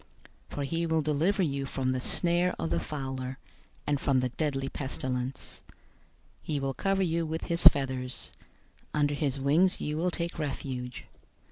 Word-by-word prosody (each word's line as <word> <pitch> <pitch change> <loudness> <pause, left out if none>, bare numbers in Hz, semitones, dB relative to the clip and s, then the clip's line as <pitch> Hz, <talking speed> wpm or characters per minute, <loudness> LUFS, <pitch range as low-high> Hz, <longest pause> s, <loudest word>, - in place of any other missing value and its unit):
091:003 - - -9
For 145 - -1
he 165 +5 -1
will 160 -1 +2
deliver 160 +7 +2
you 140 -4 -1
from 130 -2 -1
the 130 0 +1
snare 175 +6 +2
of 80 -1 -2
the 85 - +2
fowler, 130 - -4 0.5
and 145 -1 0
from 135 -2 +3
the 125 0 0
deadly 135 +1 -1
pestilence. 130 -2 -3
091:004 - - -18 0.7
He 150 -2 -2
will 135 0 -1
cover 195 +4 +1
you 170 -1 +1
with 160 +1 -3
his 170 -1 +6
feathers. 130 -2 +2 0.6
Under 145 -1 +2
his 140 -2 -1
wings 155 +7 +3
you 150 +1 -2
will 175 +3 +1
take 170 -1 -3
refuge. 130 -4 -4
140 Hz, 165 wpm, -29 LUFS, 130-165 Hz, 0.7 s, his